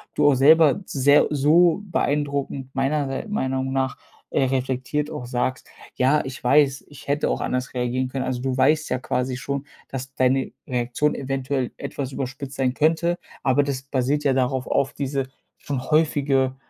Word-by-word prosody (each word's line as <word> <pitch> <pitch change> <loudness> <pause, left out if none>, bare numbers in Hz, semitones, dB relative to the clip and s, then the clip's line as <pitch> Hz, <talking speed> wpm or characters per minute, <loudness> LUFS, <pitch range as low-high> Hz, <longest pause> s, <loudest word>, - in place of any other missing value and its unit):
du 150 - +4
auch 140 - +4
selber 155 +6 +5
sehr 140 0 +4
so 160 +6 +4
beeindruckend 140 -6 -1
meiner 140 +2 0
s 135 - -4
meiner 130 -11 -1
Meinung 130 0 -2
nach, 135 -1 -1 0.3
äh, - - +1
reflektiert 130 +3 -1
auch 125 - -6
sagst: 125 +1 -2 0.3
„Ja, 135 +4 +3
ich 130 -1 -7
weiß, 140 +1 +3
ich 145 - -14
hätte 145 +1 +1
auch - - -2
anders 125 0 -2
reagieren 125 +1 -1
können.“ 130 0 -3
Also, 125 -1 -2
du 130 -1 -1
weißt 150 +3 +3
ja 125 - 0
quasi 125 0 -2
schon, 140 +2 -4 0.2
dass 135 0 -6
deine 130 0 +1 0.2
Reaktion 125 +4 0
eventuell 135 -1 -2
etwas 135 -2 -5
überspitzt 135 +1 -5
sein 130 -1 0
könnte, 165 +3 +2 0.2
aber 135 +2 +3
das 140 -2 -3
basiert 135 +2 -1
ja 140 -2 +3
darauf 130 0 0
auf 135 +1 +1
diese, 135 -1 -2 0.3
schon 140 -3 -4
häufige 140 -4 +2
135 Hz, 170 wpm, -23 LUFS, 130-145 Hz, 0.3 s, selber